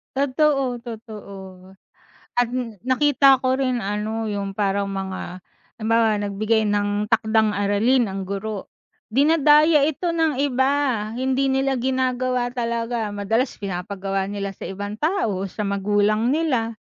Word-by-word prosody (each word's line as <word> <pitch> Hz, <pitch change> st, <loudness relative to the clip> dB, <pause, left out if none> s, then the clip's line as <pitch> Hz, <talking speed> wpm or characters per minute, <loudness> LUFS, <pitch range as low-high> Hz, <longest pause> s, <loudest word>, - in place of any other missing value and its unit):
Totoo, 275 Hz, -2 st, +1 dB
totoo 200 Hz, -5 st, -10 dB, 0.7 s
at 240 Hz, -, +2 dB, 0.4 s
nakita 275 Hz, 0 st, +5 dB
ko 255 Hz, 0 st, +2 dB
rin 255 Hz, -3 st, 0 dB
ano, 215 Hz, +2 st, -2 dB
yung 200 Hz, -1 st, -4 dB
parang 200 Hz, -1 st, 0 dB
mga 190 Hz, -2 st, -5 dB, 0.3 s
halimbawa, 225 Hz, -1 st, +2 dB
nagbigay 215 Hz, +2 st, 0 dB
ng 205 Hz, 0 st, 0 dB
takdang-aralin 220 Hz, +1 st, +2 dB
ang 195 Hz, 0 st, -4 dB
guro, 200 Hz, +1 st, -5 dB, 0.4 s
dinadaya 300 Hz, +1 st, +5 dB
ito 315 Hz, +4 st, -1 dB
ng 320 Hz, -5 st, +1 dB
iba, 265 Hz, -1 st, +2 dB, 0.5 s
hindi 265 Hz, +1 st, +1 dB
nila 270 Hz, 0 st, +1 dB
ginagawa 255 Hz, -1 st, 0 dB
talaga. 235 Hz, -2 st, -2 dB
Madalas 225 Hz, +6 st, -1 dB
pinapagawa 195 Hz, 0 st, -3 dB
nila 200 Hz, -1 st, -4 dB
sa -, -, -9 dB
ibang 205 Hz, +2 st, -5 dB
tao, 300 Hz, -, 0 dB
sa 210 Hz, +3 st, -5 dB
magulang 205 Hz, +4 st, +1 dB
nila. 250 Hz, -8 st, 0 dB
225 Hz, 115 wpm, -22 LUFS, 200-260 Hz, 0.7 s, nakita